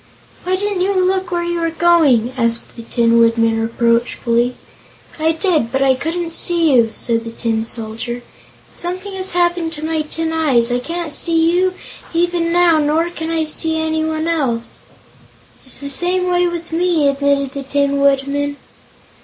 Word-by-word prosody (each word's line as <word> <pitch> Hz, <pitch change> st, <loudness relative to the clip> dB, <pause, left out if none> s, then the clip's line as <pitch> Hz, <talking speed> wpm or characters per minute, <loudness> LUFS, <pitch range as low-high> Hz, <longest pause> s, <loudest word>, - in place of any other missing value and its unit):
"Why 370 Hz, +1 st, +1 dB
didn't 400 Hz, -1 st, -2 dB
you 390 Hz, +2 st, +1 dB
look 375 Hz, 0 st, 0 dB
where 345 Hz, -1 st, -1 dB
you 345 Hz, 0 st, -2 dB
were 330 Hz, 0 st, 0 dB
going?" 315 Hz, -8 st, +3 dB
asked 230 Hz, -2 st, -1 dB
the 235 Hz, -, -8 dB
Tin 230 Hz, 0 st, +2 dB
Woodman 230 Hz, -1 st, +2 dB
reproachfully. 235 Hz, +1 st, 0 dB, 0.6 s
"I 320 Hz, +1 st, +2 dB
did, 320 Hz, -, 0 dB
but 270 Hz, +1 st, +1 dB
I 265 Hz, -1 st, +4 dB
couldn't 330 Hz, +5 st, -3 dB
see 335 Hz, -4 st, +2 dB
you," 235 Hz, -3 st, +4 dB
said 230 Hz, 0 st, -2 dB
the 230 Hz, -, -6 dB
Tin 225 Hz, -1 st, -2 dB
Soldier. 230 Hz, +2 st, -4 dB, 0.5 s
"Something 370 Hz, +3 st, -5 dB
has 380 Hz, -1 st, -2 dB
happened 345 Hz, -2 st, 0 dB
to 305 Hz, -1 st, -5 dB
my 320 Hz, -1 st, -1 dB
tin 320 Hz, +1 st, -3 dB
eyes. 260 Hz, -7 st, +2 dB
I 245 Hz, -, +1 dB
can't 335 Hz, +4 st, -4 dB
see 330 Hz, +2 st, +2 dB
you, 370 Hz, +1 st, +1 dB, 0.4 s
even 345 Hz, 0 st, +1 dB
now, 345 Hz, -2 st, +4 dB
nor 315 Hz, +3 st, +1 dB
can 320 Hz, -1 st, -5 dB
I 325 Hz, -1 st, 0 dB
see 320 Hz, +1 st, +1 dB
anyone 315 Hz, 0 st, -1 dB
else!" 260 Hz, -9 st, 0 dB, 0.9 s
"It's 260 Hz, -, -3 dB
the 280 Hz, -, -5 dB
same 360 Hz, +5 st, +2 dB
way 355 Hz, 0 st, +2 dB
with 340 Hz, -1 st, -5 dB
me," 335 Hz, -3 st, +1 dB
admitted 280 Hz, -1 st, +1 dB
the 280 Hz, -, -5 dB
Tin 280 Hz, +1 st, 0 dB
Woodman. 280 Hz, +1 st, +1 dB
315 Hz, 165 wpm, -17 LUFS, 245-345 Hz, 0.9 s, I